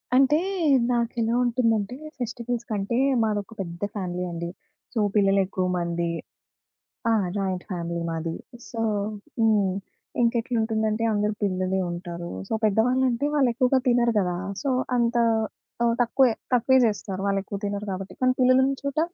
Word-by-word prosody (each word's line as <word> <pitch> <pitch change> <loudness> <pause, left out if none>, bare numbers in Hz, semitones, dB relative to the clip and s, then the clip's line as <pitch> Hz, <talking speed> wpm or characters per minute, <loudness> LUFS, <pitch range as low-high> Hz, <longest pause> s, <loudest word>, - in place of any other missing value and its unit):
అంటే 275 +3 +5 0.5
నాకెలా 235 -1 0
ఉంటుందంటే, 230 -2 +1 0.2
ఫెస్టివల్స్‌ 240 0 -3
కంటే 205 +3 -1 0.3
మాదొక 210 0 -2
పెద్ద 170 -1 -7
ఫ్యామిలీ 180 -2 -3
అండి. 170 0 -4 0.4
సో, 230 - 0 0.2
పిల్లలెక్కువ 195 -2 +2
మంది. 170 0 -1 1.0
ఆ! - - +4 0.2
జాయింట్ 190 -2 -2
ఫ్యామిలీ 170 -1 -3
మాది. 165 0 -3 0.3
సో 225 -2 -4 0.6
హ్మ్. 210 -4 +3 0.5
ఇంకెట్లుంటుందంటే, 225 -2 +1
అందరూ 210 +1 +1
పిల్లలే 185 -1 0
ఉంటారు. 175 0 -6 0.2
సో, - - -1
పెద్దవా‌ళ్ళంటే 250 +5 +2
వాళ్ళెక్కువగా 255 -1 +3
తినరు 240 -1 +3
కదా! 180 -2 0 0.3
సో, 275 - +1 0.3
అంత 235 0 +1 0.7
ఆహ్, 235 0 +3
తక్కువే 245 +1 +4 0.2
తక్కువే 250 +2 +4
జేస్తారు. 200 -3 -2
వాళ్ళెక్కువ 200 0 -1
తినరు 205 0 -3
గాబట్టి. 190 +1 -5
కానీ 255 0 +4
పిల్లలున్న 260 +1 +4
చోట 280 +1 -1
220 Hz, 120 wpm, -25 LUFS, 190-240 Hz, 1.0 s, అంటే